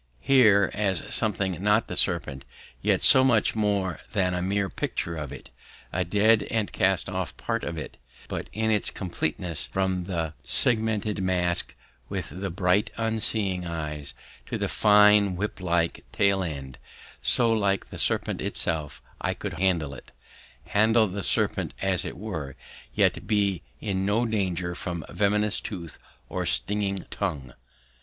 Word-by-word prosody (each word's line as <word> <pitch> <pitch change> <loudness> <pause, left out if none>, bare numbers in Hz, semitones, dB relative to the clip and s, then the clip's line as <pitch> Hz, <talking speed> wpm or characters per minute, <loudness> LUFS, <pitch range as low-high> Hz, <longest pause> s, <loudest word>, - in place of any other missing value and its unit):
Here 105 - +4
was 95 -5 -1
something 95 -5 +1
not 105 +2 +3
the - - -6
serpent, 80 -7 +1 0.4
yet - - +2
so 130 - +7
much 120 -5 +3
more 100 -4 0
than 90 -3 +1
a 90 - -2
mere 100 +2 0
picture 85 -2 -3
of 75 -4 -6
it; - - -11 0.4
a 90 - +1
dead 105 +5 +3
and 110 -2 -1
cast 95 -1 +1
off 95 -1 -4
part - - -3
of - - -4
it, - - -7 0.3
but - - -5
in 110 0 0
its 105 -2 +2
completeness, 85 -2 -3
from 95 -2 -1
the 85 -4 -3
segmented 110 -3 0
mask 90 -2 0 0.3
with 95 -4 -4
the 100 - -2
bright 95 +3 +1
unseeing 110 -5 -1
eyes, 75 -4 -5 0.3
to - - -3
the - - -1
fine 105 -2 +5
whip 105 +3 -4
like 85 -2 0
tail 100 -1 +2
end, 70 -6 -6 0.4
so 115 -2 +5
like 100 -3 0
the - - -7
serpent - - +2
itself; 75 -3 -2 0.2
I - - -1
could - - -5
handle 85 -7 +1
it, 65 - -13 0.5
handle 110 +4 +3
the 100 +2 -5
serpent - - +3
as 95 -2 0
it - - -6
were, 80 -10 -6 0.4
yet - - +1
be 100 -4 +1 0.2
in 95 -2 -2
no 110 +4 +2
danger 95 -5 -1
from 85 -3 -5
venomous 105 +1 +1
tooth 85 -6 -7 0.3
or - - -3
stinging 100 -2 0
tongue. 75 -10 -3
95 Hz, 150 wpm, -26 LUFS, 85-105 Hz, 0.5 s, so